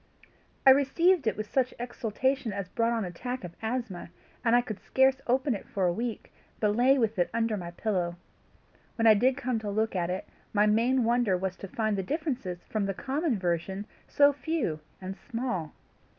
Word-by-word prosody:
I 265 - +10
received 285 +3 +3
it 215 - +1
with 215 -1 -5
such 260 -2 +1
exultation 245 +1 -1
as 200 -2 -4
brought 230 +2 +1
on 225 -3 0
an 180 - -5
attack 250 +7 -5
of 175 -1 -8
asthma, 220 -7 -3 0.3
and 230 0 +4
I 245 - +5
could 215 -4 -6
scarce 265 0 +2
open 260 +2 +2
it 200 - -6
for 195 -2 -1
a 175 - +2
week, 230 +2 -4 0.3
but 210 -1 +2
lay 260 +4 +5
with 225 -5 0
it 175 - +2
under 225 -1 +1
my 175 -4 -5
pillow. 175 -2 -1 0.8
When 225 - 0
I 220 - +9
did 255 +5 +2
come 255 -4 -1
to 215 -1 -4
look 220 +1 0
at 175 -1 0
it, 185 +1 -3 0.3
my 210 0 +4
main 235 +4 +3
wonder 230 -5 +2
was 185 0 -3
to 195 - -7
find 215 0 -1
the - - +1
differences 250 - -3
from 210 -2 -2
the 195 - -2
common 275 - -1
version 185 +2 -2 0.2
so 285 0 +5
few 290 - -2 0.2
and 190 +1 -6
small. 210 - -4
225 Hz, 195 wpm, -29 LUFS, 195-255 Hz, 0.8 s, I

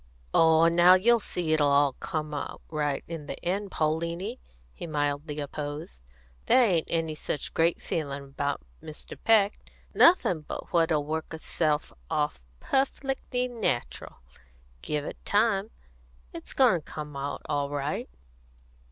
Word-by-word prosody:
"Oh, 160 0 +6
now, 175 +2 +7
you'll 235 +5 +4
see 175 -6 -2
it'll 150 -2 +3
all 140 -1 +4
come 155 -1 -4
out 145 - -5
right 150 -3 -1
in 165 -3 -6
the - - -5
end, 195 +3 -1
Pauliny," 170 +8 -2 0.3
he - - -7
mildly 145 0 -2
opposed. 145 - -6 0.5
"There 255 - +6
ain't 175 -8 +2
any 165 -1 0
such 150 -1 -4
great 165 +1 +2
feelin' 140 -3 -3
about 140 - -3 0.2
Mr. 155 - -7
Peck; 215 -2 +4 0.3
nothin' 185 - +5
but 150 - -8
what'll 165 -3 +2
work 160 +1 -3
itself 155 -1 -1 0.2
off 150 - -1 0.2
perfec'ly 270 -2 -1
natural, 225 - -2 0.7
give 150 -1 -2
it - - -8
time. 210 -1 +2 0.6
It's - - -9
goin' 235 - +4
to - - -15
come 150 -1 -6
out 140 +1 -4
all 145 -2 -1
right." 145 +1 -3
160 Hz, 135 wpm, -28 LUFS, 145-185 Hz, 0.7 s, now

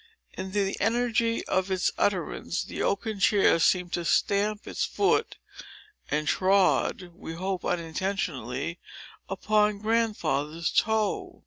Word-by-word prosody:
In 190 0 -6
the 200 -1 0
energy 230 0 +1
of 185 +1 0
its 185 -2 +1
utterance, 180 -3 -1
the - - -6
oaken 210 +1 -1
chair 195 -4 +4
seemed 180 +1 +2
to 175 - -1
stamp 205 +4 +1
its - - -2
foot, 405 - +1 0.7
and 150 0 -1
trod, 185 -1 +2
(we 170 -2 -8
hope 185 +1 -3
unintentionally) 170 - -3 0.5
upon 210 +2 +1
Grandfather's 200 -9 0
toe. 220 -2 0
195 Hz, 115 wpm, -27 LUFS, 170-210 Hz, 0.7 s, chair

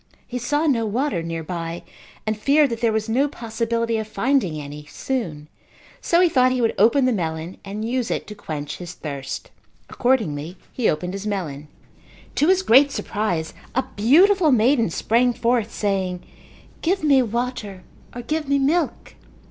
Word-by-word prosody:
He 250 0 -5
saw 290 +6 0
no 255 -7 +2
water 230 - -1
nearby 165 +1 -5 0.4
and 215 0 0
feared 280 +5 +3
that 230 - -4
there 230 -2 +3
was 220 0 -1
no 260 +6 +2
possibility 230 -2 -2
of 215 - -4
finding 215 - 0
any 145 0 -8
soon, 165 - -4 0.5
so 340 +1 +3
he 365 - +6
thought 255 -5 +3
he 255 - 0
would 230 -2 +2
open 235 +6 +5
the 255 - +3
melon 165 -2 -3
and 205 +2 -5
use 245 -1 -1
it - - -2
to 210 - -8
quench 150 -8 -6
his 175 -1 -8
thirst. 140 -5 -6 0.4
Accordingly 180 - 0 0.2
he 245 - +1
opened 180 +4 -2
his 195 +2 -5
melon. 155 -8 -4 0.7
To 300 - +2
his 375 +1 +4
great 275 0 +6
surprise, 180 -11 -2 0.2
a 260 - +2
beautiful 320 - +5
maiden 235 -2 +3
sprang 240 +8 +2
forth 235 -2 0
saying, 190 -3 -1 0.6
"Give 365 +1 0
me 280 -3 +5
water 235 -5 -3 0.3
or 245 - -6
give 305 +3 -2
me 280 0 +3
milk." 300 +4 0
225 Hz, 165 wpm, -22 LUFS, 180-260 Hz, 0.7 s, he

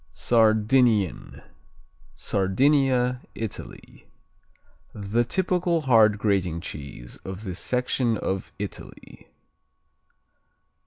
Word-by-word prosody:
Sardinian 110 - +2 0.7
Sardinia, 125 - +1
Italy 110 -3 -8 0.9
The 105 +3 0
typical 180 +3 0
hard 110 -6 +4
grating 95 -5 0
cheese 70 -7 -8
of 95 +2 -8
this 95 -3 -5
section 125 -2 0
of 95 0 -3
Italy. 100 -1 -9
110 Hz, 70 wpm, -25 LUFS, 95-125 Hz, 0.9 s, hard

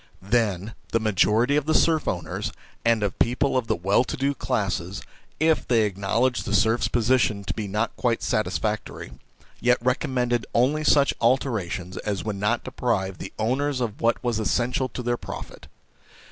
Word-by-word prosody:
Then, 105 -1 0 0.2
the 115 - +2
majority 110 +5 +2
of 150 0 -1
the 155 - +2
serf 160 -2 +3
owners 90 - -3 0.3
and 115 -2 +3
of 100 -3 -2
people 130 +4 +1
of 125 -3 0
the - - +1
well 95 +7 +2
to 155 - -4
do 140 +1 +1
classes, 100 -8 -2 0.4
if 160 0 +2
they 115 -3 +3
acknowledged 105 +4 0
the 105 - 0
serfs' 110 +3 +3
position 115 -3 +1
to - - -3
be 110 -2 -4
not 105 +4 -1
quite 120 -3 0
satisfactory, 110 - -2 0.5
yet 125 0 +3
recommended 125 -1 0
only 140 +6 +2
such 140 -2 +4
alterations 105 -8 0
as 100 -3 -3
would 105 -2 -2
not 105 +4 0
deprive 95 -7 -2
the - - -6
owners 130 +5 0
of 115 -4 -3
what 115 0 +1
was 120 -3 0
essential 125 +4 0
to 125 - -6
their 120 0 0
profit. - - -9
115 Hz, 165 wpm, -25 LUFS, 105-125 Hz, 0.5 s, such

